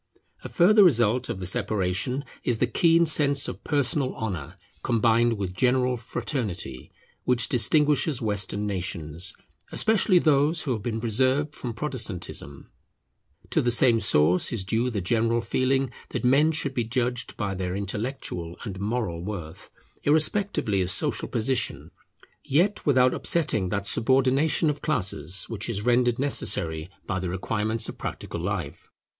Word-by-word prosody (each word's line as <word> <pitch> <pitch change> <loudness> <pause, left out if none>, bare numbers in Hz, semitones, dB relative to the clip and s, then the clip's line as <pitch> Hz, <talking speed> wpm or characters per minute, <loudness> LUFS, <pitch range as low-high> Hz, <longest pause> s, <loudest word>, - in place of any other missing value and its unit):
A - - -6
further 205 +4 +5
result 120 - +3
of - - -3
the 95 - -6
separation 105 +5 -1 0.2
is 120 - +1
the 125 - +2
keen 165 +6 +3
sense 140 -3 +3
of - - -7
personal 140 -2 0
honour, 90 -6 -5 0.2
combined 115 0 +2
with 95 -2 -3
general 125 +5 +2
fraternity, 105 - -4 0.3
which 125 -3 +1
distinguishes 145 +3 +2
Western 105 -2 -1
nations, 85 -4 -2 0.4
especially 215 -3 +3
those 155 0 +3
who 135 - -2
have 110 - -4
been 115 0 -3
preserved 130 +6 +1
from 120 -3 -6
Protestantism. 110 - -5 0.8
To - - +3
the 120 - +1
same 120 -1 +4
source 90 -3 +2
is 115 -5 -2
due 115 +5 0
the 105 -5 -3
general 115 +5 +1
feeling 130 +2 0 0.2
that - - -3
men 145 +5 +4
should 145 -3 -2
be 120 - 0
judged 125 +1 -2
by 100 -3 -2
their 90 -1 -3
intellectual 100 -4 -4
and 95 -4 -6
moral 100 -5 -2
worth, 90 -2 -7 0.3
irrespectively 155 - +1
of 90 - -1
social - - -1
position, 120 +2 -2 0.5
yet 180 +9 +1
without 130 -3 +4
upsetting 110 - +1
that 100 +1 -2
subordination 135 - +2
of 145 - -8
classes 95 - -2
which 110 -1 -4
is 105 -3 -3
rendered 120 -1 +3
necessary 85 - -1 0.2
by 95 - -2
the 90 -1 -3
requirements 110 +4 -1
of - - -8
practical - - -5
life. - - -4
115 Hz, 145 wpm, -25 LUFS, 100-135 Hz, 0.8 s, further